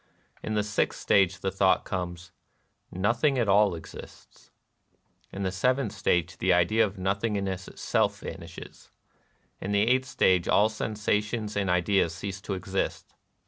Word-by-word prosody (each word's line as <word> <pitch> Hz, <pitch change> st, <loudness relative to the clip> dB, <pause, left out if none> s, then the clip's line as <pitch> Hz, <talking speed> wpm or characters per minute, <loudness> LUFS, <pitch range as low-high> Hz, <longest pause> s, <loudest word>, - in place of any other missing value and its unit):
] -, -, -34 dB
In 110 Hz, -, -2 dB
the 105 Hz, -, +1 dB
sixth 105 Hz, 0 st, -1 dB
stage 95 Hz, -2 st, +2 dB
the 95 Hz, -, -1 dB
thought 95 Hz, 0 st, +2 dB
comes, 90 Hz, -2 st, -5 dB, 0.6 s
'•^Nothing 115 Hz, +9 st, +1 dB
at 120 Hz, -3 st, +1 dB
all 100 Hz, -1 st, +4 dB
exists^ 80 Hz, -, -12 dB, 0.8 s
In 100 Hz, -, -5 dB
the 95 Hz, -, -1 dB
seventh 125 Hz, +4 st, 0 dB
stage 85 Hz, 0 st, 0 dB
the 95 Hz, -, +2 dB
idea 90 Hz, +6 st, +4 dB
of 105 Hz, -1 st, -3 dB
nothingness 95 Hz, -1 st, -2 dB
itself -, -, -1 dB
vanishes. -, -, -10 dB, 0.7 s
In 100 Hz, -, -3 dB
the 100 Hz, +1 st, +3 dB
eighth 130 Hz, +1 st, +2 dB
stage 95 Hz, -7 st, +2 dB
all 105 Hz, +2 st, +4 dB
sensations 105 Hz, 0 st, -2 dB
and 100 Hz, -2 st, 0 dB
ideas 90 Hz, -1 st, +2 dB
cease 95 Hz, 0 st, -6 dB
to 95 Hz, -, -4 dB
exist. 95 Hz, +1 st, -3 dB
100 Hz, 145 wpm, -27 LUFS, 95-105 Hz, 0.8 s, all